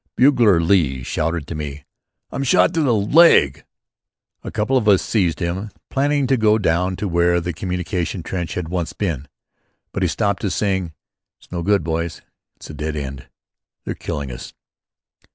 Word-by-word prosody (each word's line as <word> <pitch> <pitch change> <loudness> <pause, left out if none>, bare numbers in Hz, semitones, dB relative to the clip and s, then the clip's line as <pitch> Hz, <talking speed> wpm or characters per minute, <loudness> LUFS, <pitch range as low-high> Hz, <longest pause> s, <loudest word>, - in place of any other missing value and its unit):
Bugler 120 -9 +5
Lee 80 -7 +2
shouted 80 +3 -2
to 85 - -6
me: 75 -2 -6 0.5
"I'm 140 - -3
shot 135 - +4
through 160 -2 +1
the 120 -4 +3
leg." 105 - +5 0.8
A - - -5
couple 110 +5 -1
of 120 -5 +2
us 100 -3 +6
seized 90 -7 0
him, 95 +4 -3 0.2
planning 145 +1 +1
to 130 0 +2
go 110 -1 +4
down 90 -1 +1
to 105 - -3
where 85 0 +2
the 90 +1 -4
communication 90 0 -3
trench 90 -1 -4
had 90 -3 -3
once 85 -2 -2
been. 80 -9 -3 0.6
But - - -4
he - - +2
stopped - - -1
us, - - -1
saying: 95 -5 -1 0.5
"It's - - -23
no 85 -1 -3
good, 100 +1 +2
boys. 80 0 -3 0.3
It's - - -11
a - - -10
dead 75 +1 -4
end! 70 -3 -6 0.6
They're - - -2
killing 70 -3 -5
us." - - -9
90 Hz, 170 wpm, -20 LUFS, 80-105 Hz, 0.8 s, us